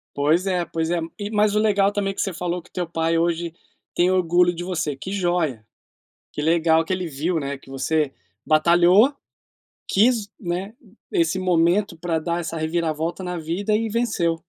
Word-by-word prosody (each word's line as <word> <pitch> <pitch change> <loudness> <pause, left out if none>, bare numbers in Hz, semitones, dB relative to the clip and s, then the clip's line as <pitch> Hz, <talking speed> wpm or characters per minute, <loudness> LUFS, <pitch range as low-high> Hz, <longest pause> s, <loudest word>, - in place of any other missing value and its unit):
Pois 155 +7 +2
é, 180 -2 0
pois 165 -1 -3
é. 175 -1 +1 0.2
E, 205 - -4
mas 210 -1 +2
o - - +5
legal 205 -2 +3
também 195 -1 -1
que - - -5
você 195 - -1
falou 175 0 -3
que - - -22
teu 180 -2 -3
pai 165 0 0
hoje 170 0 0 0.4
tem 180 +1 +3
orgulho 175 -1 +3
de 170 - -5
você, 155 -6 -2
que 190 +8 -7
joia! 175 - -1 0.7
Que 150 - -4
legal 165 0 +3
que 185 - -3
ele 185 -1 -2
viu, 160 +4 -1
né, 140 -1 -3
que 135 - -17
você 140 +1 0 0.3
batalhou, 175 - +5 0.7
quis, 220 0 +2
né, 185 +2 -4 0.4
esse 335 - +1
momento 175 +1 +2
pra 165 -1 -1
dar 170 +2 -2
essa 165 0 -5
reviravolta 160 +2 -2
na 180 -1 -4
vida, 175 +7 -2
e 225 +1 0
venceu. 210 -7 0
175 Hz, 180 wpm, -23 LUFS, 160-195 Hz, 0.7 s, o